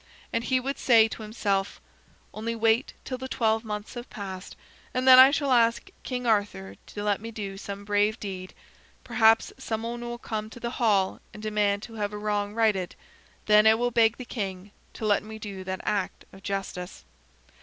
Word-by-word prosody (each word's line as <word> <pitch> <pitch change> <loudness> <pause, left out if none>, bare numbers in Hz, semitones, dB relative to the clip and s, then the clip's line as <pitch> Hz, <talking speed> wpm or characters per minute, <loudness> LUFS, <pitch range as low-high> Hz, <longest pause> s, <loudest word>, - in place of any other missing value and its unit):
And 230 - 0
he 260 +2 +2
would 275 +2 -4
say 225 -3 +6
to 225 - -8
himself: 205 -3 -1 0.5
"Only 230 +2 -3
wait 225 +3 +2
till 255 -1 -4
the 260 - -5
twelve 225 -3 +1
months 210 -1 -5
have 240 0 -8
passed, 190 -2 -7 0.4
and 255 +1 0
then 255 0 +10
I 260 +1 +10
shall 280 -1 0
ask 230 -2 +3
King 250 -1 -4
Arthur 205 - 0
to 205 - -6
let 205 -1 0
me 225 - -6
do 205 -3 -6
some 200 0 -7
brave 205 +1 +1
deed. 185 -2 -7 0.5
Perhaps 225 0 +3
some 225 -4 -3
one 235 +1 -4
will 240 0 -5
come 215 -2 -4
to 240 - -11
the 235 0 -3
hall 200 -5 +2 0.2
and 210 - -10
demand 210 -1 +1
to 230 - -9
have 205 0 -2
a - - -4
wrong 205 0 -2
righted. 210 -6 +1 0.5
Then 210 0 +6
I 220 - +7
will 245 +2 0
beg 230 -1 +3
the 255 - -7
king 195 -4 -5 0.2
to 220 - -5
let 205 -1 +3
me 220 +1 -9
do 200 -3 -7
that 185 0 -4
act 205 -3 -2
of 195 - -13
justice." 195 -2 -5
215 Hz, 195 wpm, -27 LUFS, 205-230 Hz, 0.5 s, then